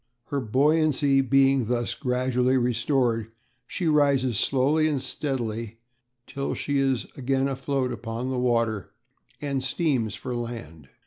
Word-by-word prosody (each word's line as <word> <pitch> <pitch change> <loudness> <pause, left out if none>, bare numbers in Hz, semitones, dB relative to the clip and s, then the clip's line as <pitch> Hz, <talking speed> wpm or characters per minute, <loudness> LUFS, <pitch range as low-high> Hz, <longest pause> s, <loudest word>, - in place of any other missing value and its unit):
Her 140 - -1
buoyancy 140 +3 +3
being 135 -1 +3
thus 120 0 0
gradually 125 -1 +1
restored 120 -2 +1 0.4
she 180 - -2
rises 140 -6 +3
slowly 145 +4 +2
and 145 -3 0
steadily 115 -5 -4 0.5
till 140 0 -3
she 145 -1 -1
is 135 -3 +1
again 135 +1 0
afloat 135 -1 -1
upon 115 +2 -4
the 130 - -1
water, 115 -4 0 0.5
and 140 -2 -2
steams 130 - 0
for 125 -2 -5
land. 110 - -7
130 Hz, 125 wpm, -25 LUFS, 120-140 Hz, 0.5 s, buoyancy